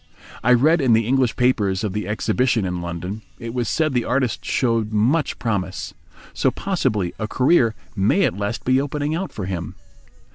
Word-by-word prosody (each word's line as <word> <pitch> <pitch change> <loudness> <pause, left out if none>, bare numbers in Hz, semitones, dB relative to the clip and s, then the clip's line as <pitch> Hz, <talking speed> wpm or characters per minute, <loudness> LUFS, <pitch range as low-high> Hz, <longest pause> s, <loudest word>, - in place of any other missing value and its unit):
I 125 - +5
read 155 +7 +4
in 125 -4 +4
the 115 0 +3
English 130 0 +2
papers 105 -6 +1
of 105 -3 -2
the 105 -2 -3
exhibition 115 +1 +1
in 90 -1 -3
London. 85 +5 -5 0.2
It 115 -1 -7
was 120 -2 -1
said 155 -3 +1
the 120 -2 +1
artist 125 -4 -1
showed 115 -4 0
much 125 +9 +1
promise. 100 -5 -3 0.4
So - - +2
possibly 130 - -1
a 110 - -2
career 125 -2 +3 0.2
may 105 - +2
at - - +1
last 100 +3 -3
be 130 +1 +3
opening 145 +1 -2
out 185 +4 -3
for 100 - -5
him. 90 -3 -4
115 Hz, 180 wpm, -22 LUFS, 105-130 Hz, 0.4 s, I